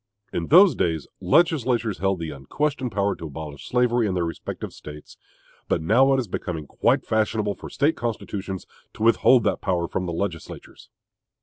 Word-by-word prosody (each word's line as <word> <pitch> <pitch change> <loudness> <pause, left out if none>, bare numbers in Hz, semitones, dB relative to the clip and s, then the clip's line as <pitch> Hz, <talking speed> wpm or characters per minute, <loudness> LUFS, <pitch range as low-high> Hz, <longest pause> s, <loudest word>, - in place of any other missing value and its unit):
In 85 - -2
those 185 +3 +7
days, 80 -3 -1
legislatures 120 - +2
held 95 -1 +1
the 80 -2 -5
unquestioned 130 - -2
power 100 0 0
to 80 - -7
abolish 75 -1 -8
slavery 120 -2 +2
in 95 - -1
their 85 -1 0
respective 85 - -6
States; 75 0 -11 0.5
but - - +1
now 115 - +4
it - - +1
is 120 - -3
becoming 85 -4 -4
quite - - +1
fashionable 110 -1 0
for - - -10
State 145 +3 +1
constitutions 100 -5 -4 0.3
to - - -5
withhold 115 +1 +5
that 105 - 0
power 90 -3 0
from 90 +1 -3
the 85 - -3
legislatures. 85 -2 -6
100 Hz, 170 wpm, -24 LUFS, 85-120 Hz, 0.5 s, those